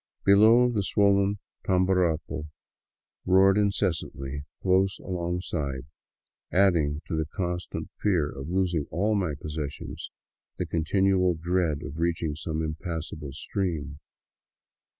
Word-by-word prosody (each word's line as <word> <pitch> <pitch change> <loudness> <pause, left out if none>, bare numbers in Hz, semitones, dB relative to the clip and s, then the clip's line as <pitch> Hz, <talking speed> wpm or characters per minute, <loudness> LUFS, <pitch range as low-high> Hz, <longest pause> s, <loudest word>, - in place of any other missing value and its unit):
Below, 110 +5 +6
the 105 -4 0
swollen 100 0 +3 0.3
Tamborapo 90 -4 +1 0.7
roared 95 +1 +5
incessantly 80 -9 -1 0.2
close 95 +1 +3
alongside, 85 -7 -3 0.7
adding 85 -6 +2
to - - -3
the 80 -1 -1
constant 90 +1 -4
fear 90 -8 +2
of 70 +1 -7
losing 90 -4 0
all 100 +7 +1
my 90 -8 0
possessions 75 -2 -6 0.5
the - - -1
continual 90 +2 +2
dread 85 -2 0
of 75 - -7
reach 85 0 0
ing 80 -2 -1
some 80 +1 -3
impassable 80 -2 -5
stream. 80 -3 -3
85 Hz, 110 wpm, -27 LUFS, 80-95 Hz, 0.7 s, Below